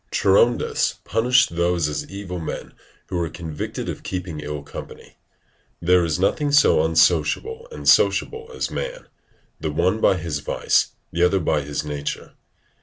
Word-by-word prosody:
Charondas 110 +5 +2
punished 125 -3 +2
those 85 -2 +1
as 75 - -4
evil 95 -2 -6
men 80 - -6 0.3
who 90 - -4
were 85 -2 -1
convicted 80 -2 -5
of - - -5
keeping 90 -4 -5
ill 75 -1 -5
company. - - -11 0.6
There 90 +1 +4
is 80 -2 0
nothing 145 +9 +1
so 145 - +5
unsociable 80 - +2
and - - -7
sociable 450 +1 +3
as 460 - -3
man, - - -5 0.5
the - - -2
one 110 - +1
by 95 - +4
his 80 -4 -3
vice, - - +1 0.2
the 85 - -2
other 90 +2 +4
by 80 -3 +1
his 75 +1 -4
nature. 75 -1 -5
85 Hz, 150 wpm, -22 LUFS, 80-115 Hz, 0.6 s, so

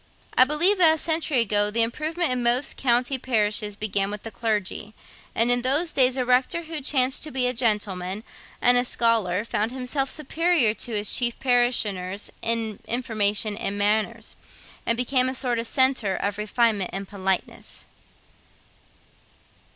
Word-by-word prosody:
I 255 - +7
believe 340 +8 +2
that 320 -3 +6
a - - -7
century 315 -5 +1
ago 205 -2 +2
the 230 +2 +2
improvement 310 +7 -1
in 250 -1 0
most 240 +3 +1
country 250 +1 +1
parishes 210 -4 0
began 200 -1 -1
with 210 0 -7
the 225 - -7
clergy; 210 0 -3 0.4
and 230 +2 +2
that - - +5
in 245 - 0
those 290 +7 +2
days 260 -1 +2
a 255 - -1
rector 255 +7 +1
who 320 -2 -4
chanced 265 -1 +1
to 310 - -3
be 260 -3 -1
a 250 - 0
gentleman 210 -4 -1 0.4
and 245 0 +5
a - - +1
scholar 225 -5 +1
found 220 0 -2
himself 265 +1 -2
superior 310 -5 +1
to 230 0 -6
his 205 0 0
chief 240 -2 0
parishioners 215 -7 0
in 225 -2 -2
information 215 -3 0
and 205 -1 -4
manners, 210 +1 -1 0.5
and 230 - +1
became 255 +1 +2
a 260 - -4
sort 245 -3 +1
of 230 - -1
centre 260 -8 +1
of 200 +2 -3
refinement 210 -3 0
and 195 0 -6
politeness. 190 -2 -4
235 Hz, 160 wpm, -24 LUFS, 210-260 Hz, 0.5 s, I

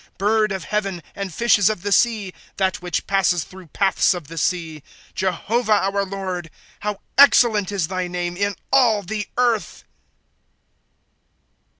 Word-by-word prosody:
^ - - -38
Bird 215 +2 +2
of 190 -2 -4
heaven, 195 -5 -3
and 200 -2 -5
fishes 210 +1 +3
of 215 -5 -4
the 205 - -2
sea, 210 -4 +2
— - - -30
That 190 -2 0
which 175 -2 -3
passes 185 -4 +1
through 185 -2 -14
paths 190 +3 +2
of 170 -5 -8
the 165 - -9
seas. 160 -3 -2 0.3
'■' - - -37
Jehovah, 210 +4 0 0.2
our 200 0 +1
Lord, 185 -3 -5 0.3
How 210 -1 -4 0.2
excellent 225 -8 +5
is 190 -6 -1
thy 185 0 -3
name 175 0 -3
in 200 +1 -1 0.2
all 230 -6 +4
the 210 +1 -4
earth 240 -4 0
195 Hz, 160 wpm, -21 LUFS, 180-210 Hz, 0.3 s, excellent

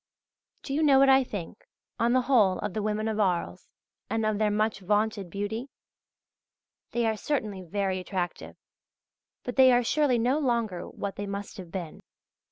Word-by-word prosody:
Do 275 - -5
you 300 - +1
know 285 -3 +5
what 270 0 +6
I 265 0 +6
think, 205 -4 -7 0.4
on 235 +1 +2
the 255 - +4
whole, 220 -8 +4
of 205 -2 -4
the 215 - -2
women 215 +1 -1
of 220 -1 -2
Arles, 185 -4 -1 0.4
and 225 -1 0
of 215 -1 0
their 215 -1 +2
much 215 0 0
vaunted 205 0 0
beauty? 205 +7 -4 1.2
They 240 -1 0
are 220 -1 +1
certainly 215 -6 -2
very 190 +1 -2
attractive; 180 -1 -4 0.9
but 245 - -6
they 260 -1 +7
are 245 0 +4
surely 285 0 +2
no 250 +6 +1
longer 230 - -1
what 200 -1 -6
they 205 - -4
must 200 +2 -6
have 180 -3 -9
been. 175 -5 -6
215 Hz, 175 wpm, -27 LUFS, 200-245 Hz, 1.2 s, they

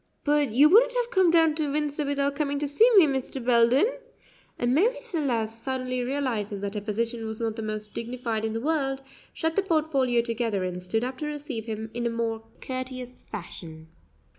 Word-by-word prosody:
"But 295 -2 +2
you 275 +7 +6
wouldn't 480 +9 +6
have 485 -1 0
come 375 -4 +4
down 325 -2 +5
to 300 -2 -1
Windsor 295 0 -1
without 280 0 0
coming 285 -1 -1
to 290 +1 -1
see 435 - +5
me, 370 - +9
Mr. 265 -2 -3
Belden?" 240 - +5 0.7
and 240 +1 +1
Marie 430 - +3
Celeste, 245 - -2
suddenly 255 -1 -2
realizing 245 -6 -2
that 200 0 -3
her 210 - -3
position 225 +2 -2
was 220 0 -5
not 225 -2 -2
the 225 - -5
most 215 -1 -4
dignified 235 -2 -3
in 220 0 -1
the 225 - -3
world, 270 -2 -1 0.3
shut 320 0 -2
the - - +3
portfolio 300 -9 +1
together 230 -4 -1
and 180 0 -3
stood 220 +6 -1
up 255 +1 -4
to 300 - -3
receive 290 -6 -5
him 220 0 -5
in 235 0 -1
more 230 -1 -2 0.2
courteous 255 -1 -6
fashion. 165 -5 -8
255 Hz, 190 wpm, -26 LUFS, 225-295 Hz, 0.7 s, me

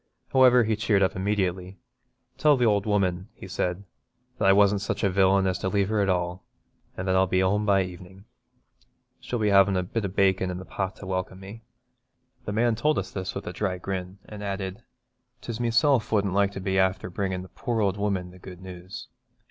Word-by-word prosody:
However, 125 -2 +6
he 110 0 0
cheered 105 -2 +2
up 95 - 0
immediately: 95 -1 -2 0.6
'Tell 150 -2 +5
th' - - -4
ould 105 -2 +2
woman,' 95 -2 0
he - - -10
said, 90 0 -2 0.6
'that 100 - +2
I - - +7
wasn't 100 0 +4
such 100 - -3
a 100 - +2
villain 95 0 +3
as 95 0 0
to 95 - -1
leave 100 0 +1
her 110 -1 +1
at 100 - +1
all, 90 -1 +1
at 90 - -6
all, 90 - -17 0.6
an' - - -4
that 95 -1 +1
I'll 95 0 +3
be 95 +1 +1
home 105 +3 +1
by 100 -1 +4
evenin'. 90 +2 -11 0.9
She'll 120 - -4
be 105 -2 +1
havin' 100 -1 +5
a 90 - 0
bit 110 +5 -3
o' - - 0
bacon 95 -1 +1
in 90 - -4
the 95 - -8
pot 95 0 -4
to - - -11
welcome 95 0 -3
me.' 100 +4 -10 0.8
The - - -3
man 115 +3 +2
told 150 +8 +1
us 95 -1 -3
this 95 -1 -5
with 100 - -5
a - - -5
dry 95 -3 -2
grin, 95 0 -5
and 105 -1 -9
added, 100 +1 -4 0.6
''Tis 115 -2 -6
meself 120 +1 +2
wouldn't 100 -3 +1
like 100 0 +2
to - - -5
be 95 0 -1
afther 95 0 0
bringin' 95 0 -3
the 95 - -12
poor 120 -3 -3
ould 100 -2 +1
woman 100 -3 -2
the 90 - -15
good 90 -1 -11
news. 95 0 -9
95 Hz, 220 wpm, -26 LUFS, 95-105 Hz, 0.9 s, I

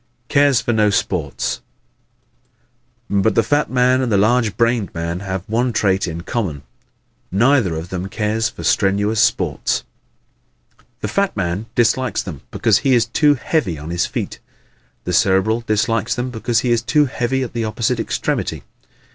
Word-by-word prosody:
Cares 140 -3 +4
for 120 - -1
No 105 -1 +3
Sports 90 -6 -1 1.5
¶ 100 -1 +2
But 110 - +2
the 115 - +4
fat 145 +4 +1
man 130 0 +3
and 125 -3 -1
the 100 - +3
large 110 +1 +2
brained 115 -4 +1
man 85 +1 -3
have 95 -1 -4
one 120 +3 0
trait 95 -4 +1
in 85 0 -5
common. 85 - -3 0.7
Neither 115 - +3
of 80 +2 -6
them 95 +1 -4
cares 110 +2 -1
for - - -10
strenuous 105 +2 +2
sports. 95 - 0 1.2
The - - -2
fat 200 - -1
man 95 +3 -2
dislikes 120 -1 +1
them 75 -7 -8
because 110 -2 +2
he 135 -2 +3
is 115 -2 +3
too 145 +5 +3
"heavy 125 - -1
on 75 +3 -7
his 85 - 0
feet." - - -4 0.6
The 90 - -3
Cerebral 95 +6 +2
dislikes 110 +1 +1
them 125 +1 -3
because 115 0 0
he 125 - 0
is 120 -1 +2
too 145 +6 +3
heavy 130 0 -1
at 125 - -6
the 115 -1 -2
opposite 115 +2 -1
extremity. - - -2
110 Hz, 165 wpm, -19 LUFS, 95-120 Hz, 1.5 s, Cares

